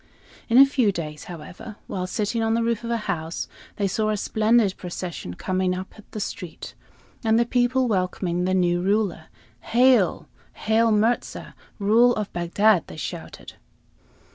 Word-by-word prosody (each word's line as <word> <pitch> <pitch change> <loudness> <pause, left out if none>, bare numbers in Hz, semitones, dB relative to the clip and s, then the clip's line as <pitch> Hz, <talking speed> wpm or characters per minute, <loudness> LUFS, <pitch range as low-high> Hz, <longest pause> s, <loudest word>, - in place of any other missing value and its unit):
In 230 - +4
a 275 - +10
few 260 -6 +2
days, 150 -5 -6
however, 175 +5 -9
while 185 -1 -4
sitting 210 +4 -1
on 225 0 +1
the 230 - +1
roof 230 -1 -1
of 235 - -4
a 235 - +1
house, 165 -3 -3 0.3
they 200 - 0
saw 215 +3 0
a 215 - 0
splendid 215 -1 +2
procession 175 - -6
coming 185 - -1
up 185 +1 -7 0.2
the 215 - -6
street, 180 -4 -6 0.5
and 220 0 +3
the 235 - +3
people 250 +1 +2
welcoming 180 -3 -1
the 185 0 +1
new 175 -1 +2
ruler. 195 -4 0 0.3
"Hail! 250 - +3 0.3
Hail 225 +1 +2
Mirza, 225 +3 0 0.2
ruler 230 +4 +4
of 210 -2 -4
Bagdad!" 180 +2 +2
they - - -10
shouted. 130 -4 -7
205 Hz, 155 wpm, -24 LUFS, 180-230 Hz, 0.5 s, a